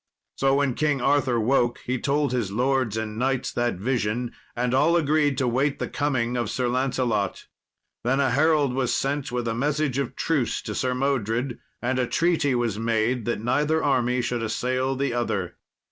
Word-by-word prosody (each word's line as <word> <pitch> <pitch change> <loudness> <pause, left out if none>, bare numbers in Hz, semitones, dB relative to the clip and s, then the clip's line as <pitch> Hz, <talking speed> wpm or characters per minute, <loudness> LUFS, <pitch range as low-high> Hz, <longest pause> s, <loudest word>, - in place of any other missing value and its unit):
So 135 0 +2
when 140 -2 +1
King 145 0 +1
Arthur 135 -2 +2
woke 120 +1 +2
he 125 0 -1
told 145 0 +1
his 120 -6 -1
lords 125 -1 +1
and 110 0 -4
knights 130 0 0
that 120 -2 0
vision, 120 +2 -1 0.2
and 125 +1 0
all 155 +6 +4
agreed 150 -3 +2
to 130 -2 +1
wait 135 +4 +1
the - - -3
coming 130 -5 -1
of 120 -4 -1
Sir 125 +1 -1
Lancelot. 125 -5 -1 0.6
Then 130 +3 +1
a 135 -3 +2
herald 145 -1 +3
was 130 -2 0
sent 140 -1 -1
with 120 -1 -2
a 115 - 0
message 140 +2 0
of 140 - -3
truce 145 -7 0
to - - -4
Sir 130 -1 -1
Modred, 125 -2 -1 0.2
and 130 +1 0
a 125 - +1
treaty 160 -5 +1
was 115 -4 -1
made 115 +1 0
that 120 -3 -1
neither 150 +7 +1
army 125 -2 +1
should 120 -1 -2
assail 130 +4 -1
the 135 -2 -1
other. 100 -7 -2
125 Hz, 180 wpm, -25 LUFS, 120-140 Hz, 0.6 s, all